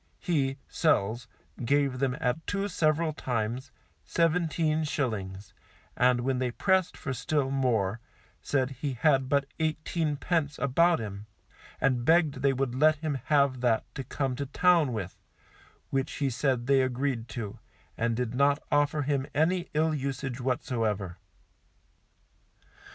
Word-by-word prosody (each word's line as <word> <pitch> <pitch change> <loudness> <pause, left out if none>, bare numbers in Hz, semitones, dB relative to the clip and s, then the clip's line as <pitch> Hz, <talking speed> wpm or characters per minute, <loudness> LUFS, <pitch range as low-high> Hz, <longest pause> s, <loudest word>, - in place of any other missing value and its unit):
He 140 -6 0
[Sells] 120 -6 +1 0.4
gave 140 0 +1
them 135 0 0
at 160 +2 -1
two 200 0 -1
several 160 -3 +1
times, 125 -1 -3 0.3
seventeen 165 -2 +1
shillings, 105 - -3 0.4
and 125 -1 +3
when 130 0 0
they 130 -1 0
pressed 190 +7 +1
for 140 - -4
still 135 +2 -1
more, 115 -6 +1 0.4
said 135 -2 0
he 135 +1 -3
had 135 +1 +2
but 140 0 +2
eighteen 155 0 -1
pence 150 -2 -1
about 165 +6 +3
him, 105 -1 -6 0.5
and 130 -3 +1
begged 155 -3 +3
they 140 0 +4
would 135 -2 -1
let 155 +4 +4
him 150 -3 -3
have 140 -4 +2
that 120 -3 +2
to 135 - -5
come 135 0 -2
to 140 0 -3
town 170 -1 +3
with, 100 -6 -5 0.7
which 135 -1 -1
he 140 -2 -1
said 125 -1 0
they 135 0 +4
agreed 130 -2 -1
to, 110 -5 -6 0.4
and 115 0 0
did 125 -1 -2
not 140 +2 +3
offer 145 0 +2
him 140 -1 0
any 175 +4 +1
ill 155 +1 +2
usage 135 -2 -3
whatsoever. 110 -7 -1
135 Hz, 140 wpm, -28 LUFS, 125-155 Hz, 0.7 s, they